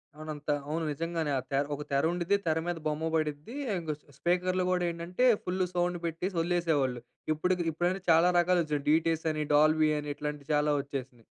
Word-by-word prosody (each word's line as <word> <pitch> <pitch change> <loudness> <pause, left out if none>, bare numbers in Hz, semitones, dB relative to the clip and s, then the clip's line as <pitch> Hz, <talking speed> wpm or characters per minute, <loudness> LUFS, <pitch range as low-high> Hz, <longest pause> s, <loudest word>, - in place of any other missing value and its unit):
అవును. 155 0 -7
అంత 150 +1 -9 0.2
అవును. 160 +2 -1
నిజంగానే 165 0 -2
ఆ - - -4
తెర్ 140 +1 +1
ఒక 145 - -7
తెర 140 0 +2
ఉండిద్ది. 175 +3 +1
తెర 160 0 +2
మీద 175 -1 -1
బొమ్మ 155 +2 -1
పడిద్ది. 155 - -2 0.2
ఇంకా 160 -2 -3
స్ - - -32
స్పీకర్లు 180 +4 +1
గూడా 180 -1 +1
ఏంటంటే 170 +8 -1 0.2
ఫుల్ 185 +1 0
సౌండ్ 175 0 0
పెట్టేసి 170 +4 -2
వదిలేసేవాళ్ళు. 160 -8 +1 0.3
ఇపుడు 180 +4 +1 0.2
ఇప్పుడయితే 175 +4 -1
చాలా 165 +2 +6
రకాలుగా 175 0 +3
వచ్చినాయి 150 -2 -2
డిటిఎస్ 165 +1 +2
అని 155 0 -1
డాల్బీ 155 +1 +5
అని 150 0 -5
ఇట్లాంటివి 150 -1 -5
చాలా 150 0 +2
వచ్చేసినాయి. 130 -4 -7
160 Hz, 180 wpm, -30 LUFS, 150-175 Hz, 0.3 s, చాలా